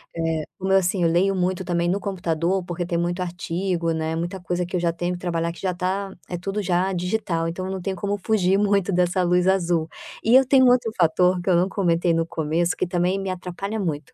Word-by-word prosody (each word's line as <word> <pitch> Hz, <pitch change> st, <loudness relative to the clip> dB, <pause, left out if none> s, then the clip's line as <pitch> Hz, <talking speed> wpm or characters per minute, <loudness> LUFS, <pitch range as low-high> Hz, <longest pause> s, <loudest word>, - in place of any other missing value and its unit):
Eh, 165 Hz, -1 st, -1 dB
como 190 Hz, 0 st, -2 dB
eu, 195 Hz, -, +6 dB
assim, 180 Hz, 0 st, +1 dB
eu 165 Hz, -, +4 dB
leio 190 Hz, +3 st, +2 dB
muito 185 Hz, 0 st, -1 dB
também 175 Hz, -1 st, 0 dB
no 195 Hz, +2 st, 0 dB
computador, 180 Hz, -1 st, -1 dB
porque 175 Hz, 0 st, -4 dB
tem 170 Hz, -1 st, -3 dB
muito 175 Hz, +2 st, -1 dB
artigo, 175 Hz, 0 st, -2 dB
né, 160 Hz, 0 st, -2 dB
muita 175 Hz, +3 st, -3 dB
coisa 180 Hz, 0 st, -2 dB
que 185 Hz, -, -5 dB
eu 180 Hz, -, +1 dB
já 170 Hz, -1 st, 0 dB
tenho 175 Hz, +1 st, -2 dB
que 175 Hz, -, -6 dB
trabalhar 170 Hz, -2 st, -1 dB
que 170 Hz, -, -13 dB
já 185 Hz, -2 st, -1 dB
tá 190 Hz, +2 st, -2 dB, 0.2 s
é 175 Hz, -, -3 dB
tudo 195 Hz, +4 st, -3 dB
já 185 Hz, +1 st, 0 dB
digital, 180 Hz, -2 st, -1 dB
então 185 Hz, +3 st, -4 dB
eu 190 Hz, -, -4 dB
não 190 Hz, -1 st, -4 dB
tenho 190 Hz, +1 st, -3 dB
como 200 Hz, +2 st, -2 dB
fugir 195 Hz, -3 st, +2 dB
muito 200 Hz, -2 st, +2 dB
dessa 180 Hz, +1 st, +2 dB
luz 180 Hz, +1 st, +2 dB
azul. 170 Hz, -4 st, +1 dB, 0.3 s
E 230 Hz, +3 st, +4 dB
eu 265 Hz, 0 st, +7 dB
tenho 260 Hz, -1 st, +5 dB
um -, -, +7 dB
outro 240 Hz, -3 st, +2 dB
fator 180 Hz, +2 st, +3 dB
que 185 Hz, -, -2 dB
eu 175 Hz, -, +4 dB
não 180 Hz, +2 st, +3 dB
comentei 175 Hz, -3 st, +1 dB
no 165 Hz, 0 st, +1 dB
começo, 165 Hz, +3 st, -1 dB
que -, -, 0 dB
também 180 Hz, +2 st, 0 dB
me 195 Hz, -1 st, -3 dB
atrapalha 185 Hz, +4 st, -5 dB
muito, 155 Hz, -6 st, -3 dB
180 Hz, 240 wpm, -23 LUFS, 170-190 Hz, 0.3 s, eu